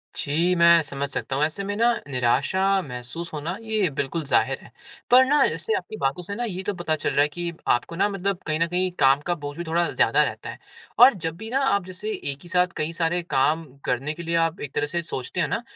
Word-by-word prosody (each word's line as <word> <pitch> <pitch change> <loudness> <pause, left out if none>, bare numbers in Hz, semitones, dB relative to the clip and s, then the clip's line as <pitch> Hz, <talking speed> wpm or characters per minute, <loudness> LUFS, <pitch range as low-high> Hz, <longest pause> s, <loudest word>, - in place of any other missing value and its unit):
जी, 170 +4 +1
मैं 170 -1 +6
समझ 140 -1 -4
सकता 135 - -3
हूँ 145 - +1
ऐसे 160 +6 -2
में 205 +1 -3
न - - 0 0.3
निराशा 130 +9 +1 0.2
महसूस 130 +4 -7
होना 155 +5 -3
ये 215 -5 0
बिल्कुल 155 +4 -2
ज़ाहिर 140 - +1
है। - - -16 0.4
पर 255 +1 +8
न 285 +1 +4
जैसे 450 - -2
आपकी 215 - -7
बातों 140 +6 -1
से 200 +3 -6
न 240 +1 -2
ये 185 0 -4
तो 205 - -2
पता 175 -3 -1
चल 145 - -2
रहा 145 - +2
है 145 - +4
कि 170 +2 -4
आपको 120 +7 +1
न 195 - +2
मतलब 195 -1 -2
कहीं 155 +1 0
न 165 - +2
कहीं 180 +1 0
काम 135 0 +5
का 175 - +1
बोझ 145 -2 -7
भी 175 - -3
थोड़ा 170 +1 0
ज़्यादा - - +3
रहता - - -4
है। - - -8 0.4
और 250 +2 +9
जब 165 -4 -4
भी 220 +2 -7
न - - -8
आप 200 -9 +2
जैसे 185 +4 -6 0.2
एक 140 - -9
ही 175 - -13
साथ 180 0 +3
कई 155 +2 -2
सारे 170 +1 0
काम 150 +4 +2 0.2
करने 135 +5 -1
के 170 +2 -8
लिए 170 0 -2
आप 165 +1 -4
एक 145 - -6
तरह 145 - +1
से 170 +2 -2
सोचते 130 -6 -4
हैं - - +1
न - - -1
170 Hz, 245 wpm, -24 LUFS, 145-185 Hz, 0.4 s, और